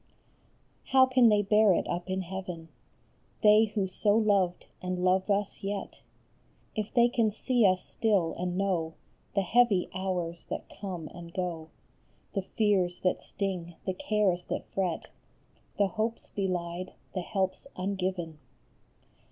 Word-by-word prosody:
OW 260 -1 +8
can 255 -2 +5
they 210 -1 +4
bear 210 -1 +5
it - - -1
up 175 +1 -3
in 190 0 0
heaven, 180 -3 -6 0.7
They 210 +1 +7
who 205 -2 -1
so 205 +3 +2
loved, 200 -5 +2 0.2
and 180 0 -2
love 185 +2 +2
us 200 0 0
yet, 200 0 -4 0.7
If 215 -1 -2
they 240 -1 +5
can 235 -2 +2
see 235 +1 +2
us 185 -1 +1
still, 200 -7 +1
and 180 0 -3
know 175 -5 0 0.4
The 200 - +3
heavy 210 -2 +3
hours 180 -3 -3
that - - -4
come 180 -6 -6
and 170 -1 -10
go, 170 -3 -3 0.6
The 195 - 0
fears 190 -3 +1
that 180 - +1
sting, 180 -4 -4
the 190 - 0
cares 190 -3 +1
that - - -3
fret, 185 -4 -1 0.7
The 205 - +4
hopes 225 +2 -3
belied, 180 -2 -3 0.2
the 185 - -1
helps 190 +6 -2
ungiven 185 -4 -3
190 Hz, 140 wpm, -29 LUFS, 180-210 Hz, 0.7 s, OW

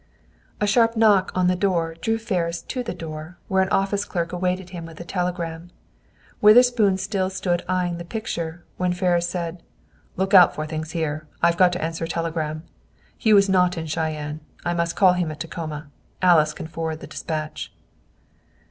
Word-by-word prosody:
A 210 - +1
sharp 230 +2 +3
knock 205 -4 +4
on 185 -1 +2
the 180 0 +3
door 175 -4 0
drew 225 +7 -1
Ferris 175 -7 -2
to 255 - -4
the 235 - -5
door, 160 0 -8
where 190 0 +2
an 190 - +1
office 200 +1 +1
clerk 170 -3 -3
awaited 180 0 -2
him 175 -2 -6
with 165 -1 -12
a - - -5
telegram. 175 -2 -3 0.7
Witherspoon 215 -2 +6
still 190 -1 -1
stood 175 -2 -1
eying 180 -2 0
the - - -5
picture, 170 -4 -5
when 180 -1 0
Ferris 175 -1 +1
said, 170 -1 -4 0.6
"Look 190 +2 -1
out 180 -3 +8
for 155 - -3
things 155 +1 -5
here. 155 -2 -2 0.2
I've 170 0 +4
got 180 0 +5
to 180 - -3
answer 165 0 -2
a - - -8
telegram. 160 -2 -2 0.5
Hugh 215 -3 +4
is 200 0 +5
not 180 -2 +3
at 160 -2 -4
Cheyenne. 155 -2 -3 0.3
I 175 - +1
must 170 0 -1
call 185 -2 +5
him 180 -2 -1
at 155 -1 -7
Tacoma. 155 -2 -6 0.3
Alice 160 -5 +4
can - - -6
forward 160 -1 -4
the - - -7
dispatch." 155 -1 -5
175 Hz, 180 wpm, -23 LUFS, 165-190 Hz, 0.7 s, out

